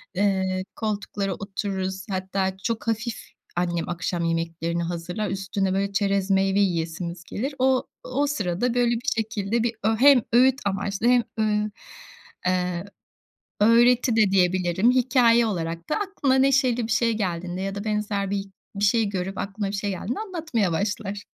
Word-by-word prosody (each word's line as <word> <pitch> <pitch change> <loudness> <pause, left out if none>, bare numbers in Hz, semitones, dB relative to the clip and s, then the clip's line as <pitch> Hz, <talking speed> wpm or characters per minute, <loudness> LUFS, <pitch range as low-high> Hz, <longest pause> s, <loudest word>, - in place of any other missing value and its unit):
eee, 190 -1 +1
koltuklara 205 -2 -2
otururuz. 190 0 -4
Hatta 190 0 -2
çok 230 0 -2
hafif 225 +1 -1 0.4
annem 175 -1 -1
akşam 175 0 -2
yemeklerini 165 0 -1
hazırlar, 175 +5 -3
üstüne 195 0 -1
böyle 200 +1 0
çerez 200 -1 +1
meyve 195 +1 +3
yiyesimiz 170 -1 -1
gelir. 270 - -4
O 260 0 +2 0.2
o 280 +3 0
sırada 230 -3 -1
böyle 245 -1 +2
bir 240 +4 -6
şekilde 220 0 -1
bir 235 -1 0
ö 225 +1 +2
hem 275 -1 +7
öğüt 260 +3 +5
amaçlı 200 +2 -1
hem, 245 -1 +5 0.2
ııı, 210 -1 +1 0.8
eee, 180 -1 0 0.8
öğreti 240 +2 +5
de 215 -3 +4
diyebilirim. 185 +3 +3
Hikâye 245 -2 +4
olarak 170 -5 -3
da - - +1
aklına 390 -10 0
neşeli 265 -2 +3
bir - - -5
şey 230 +1 +3
geldiğinde 180 -2 -3
ya 195 0 -3
da 200 - -4
benzer 210 -2 -1
bir 200 -1 -1 0.3
bir 200 - -3
şey 215 0 +2
görüp 190 0 -3
aklına 200 +1 -3
bir 200 - -3
şey 200 +1 -2
geldiğinde 195 +6 -4
anlatmaya 320 - -1
başlar. 205 +3 -2
200 Hz, 150 wpm, -24 LUFS, 185-230 Hz, 0.8 s, hem